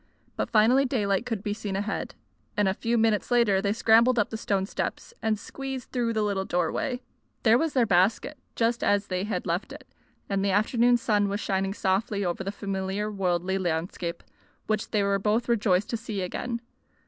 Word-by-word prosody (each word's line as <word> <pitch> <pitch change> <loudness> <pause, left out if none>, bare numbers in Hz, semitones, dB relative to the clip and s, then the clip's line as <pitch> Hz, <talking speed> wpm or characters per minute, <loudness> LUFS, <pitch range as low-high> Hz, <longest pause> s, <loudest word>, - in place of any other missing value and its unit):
But - - -2
finally 230 +5 +5
daylight 220 -4 0
could 225 -5 -3
be 205 -2 -1
seen 205 -2 -4
ahead, 205 +2 -3 0.4
and 205 -1 +3
a 190 - +2
few 230 +4 -1
minutes 220 -2 +2
later 230 -6 +3
they 200 0 0
scrambled 230 +3 +4
up 210 - +1
the - - -3
stone 200 -3 0
steps 345 - -4
and 220 -1 +1
squeezed 265 +4 -7
through 240 -2 0
the 215 -1 +1
little 200 -2 0
doorway. 190 +9 -1 0.4
There 225 -1 +6
was 325 0 0
their 250 -3 +3
basket, 205 +9 +2 0.2
just 235 +1 +1
as 205 0 +2
they 185 0 -2
had 205 -4 -3
left 175 +2 -2
it, - - -11 0.4
and 195 -1 0
the 200 - +1
afternoon 235 +5 +3
sun 210 -3 +1
was 200 +1 -2
shining 195 -1 -1
softly 200 +1 0
over 175 +2 -2
the 195 - -3
familiar 195 +1 -3
worldly 190 -1 0
landscape, 170 0 -3 0.4
which 215 0 -1
they 210 -2 +1
were 200 0 +1
both 215 +4 +1
rejoiced 205 -5 +2
to 230 - 0
see 215 -4 -4
again. 235 +6 -4
205 Hz, 190 wpm, -27 LUFS, 195-230 Hz, 0.4 s, There